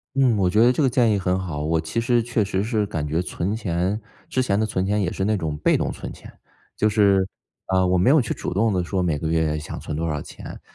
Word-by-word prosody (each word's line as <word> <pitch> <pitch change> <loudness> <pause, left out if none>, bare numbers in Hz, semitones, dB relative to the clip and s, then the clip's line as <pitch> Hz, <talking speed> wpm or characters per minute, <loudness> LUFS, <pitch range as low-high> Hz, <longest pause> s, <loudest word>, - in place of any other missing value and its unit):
嗯， 130 -4 +4
我 95 -3 +2
觉 105 +5 +3
得 120 +2 +6
这 155 - 0
个 135 - +4
建 120 -3 +3
议 100 - +1
很 90 0 0
好， 80 -6 -4
我 80 +1 +1
其 80 +8 -2
实 120 0 +2
确 120 -2 0
实 95 -1 -1
是 110 -1 0
感 80 -5 -3
觉 80 +4 0
存 90 +3 -3
钱， 95 0 -1 0.3
之 130 - +1
前 100 -5 +1
的 110 - +2
存 95 -3 -1
钱 105 +2 +1
也 90 -3 -1
是 - - -3
那 105 +1 +1
种 80 -5 -3
被 - - +3
动 - - -1
存 - - -7
钱， - - -12 0.4
就 110 - +2
是 100 -3 +3 0.4
啊， 95 -1 +2
我 90 0 +2
没 95 - +4
有 155 +3 +6
去 115 - -1
主 - - -5
动 105 +4 +1
地 90 -1 0
说 90 +1 -1
每 80 -4 0
个 80 - -3
月 80 -1 +1
想 75 - -7
存 - - -5
多 80 +2 -2
少 75 -1 -2
钱， - - -9
95 Hz, 290 characters per minute, -23 LUFS, 85-110 Hz, 0.4 s, 得